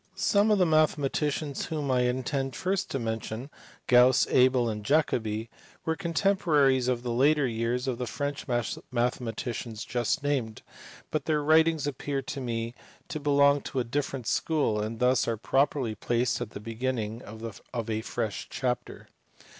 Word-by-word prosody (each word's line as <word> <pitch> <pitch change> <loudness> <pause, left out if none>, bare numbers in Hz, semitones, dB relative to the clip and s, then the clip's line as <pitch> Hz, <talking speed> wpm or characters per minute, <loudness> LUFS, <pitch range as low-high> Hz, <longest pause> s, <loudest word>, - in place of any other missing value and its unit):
Some 205 +1 +3
of 210 - +4
the 185 - +4
mathematicians 150 -2 +1
whom 150 -4 -2
I 125 - +3
intend 130 +1 -2
first 190 +1 -1
to - - -2
mention, 115 +2 -4 0.3
Gauss, 125 0 +6
Abel, 125 -1 +4
and 105 -2 -3
Jacobi, 115 -5 +1 0.4
were 160 - +1
contemporaries 160 -7 +2
of 125 -1 0
the 120 - -2
later 140 +4 +3
years 120 +2 -1
of 125 -2 -2
the 125 - -2
French 145 +4 -4 0.4
mathematicians 120 -2 -2
just 120 +5 -1
named, 130 -7 -1 0.5
but 155 - -1
their 150 -2 +1
writings 160 0 +4
appear 140 0 -3
to 135 +2 -5
me 115 -1 -3 0.4
to 155 - -3
belong 140 0 +4
to 135 - -3
a - - +1
different 135 0 -3
school, 140 -6 +1
and 110 +2 -4
thus 125 +1 +2
are 115 -1 0
properly 135 0 +1
placed 120 +2 0
at 120 - -3
the 100 - -8
beginning 115 0 -3
of 110 0 -8 0.3
a 110 -1 -1
fresh 110 -2 -3
chapter. 125 -2 -3
130 Hz, 155 wpm, -28 LUFS, 115-145 Hz, 0.5 s, Gauss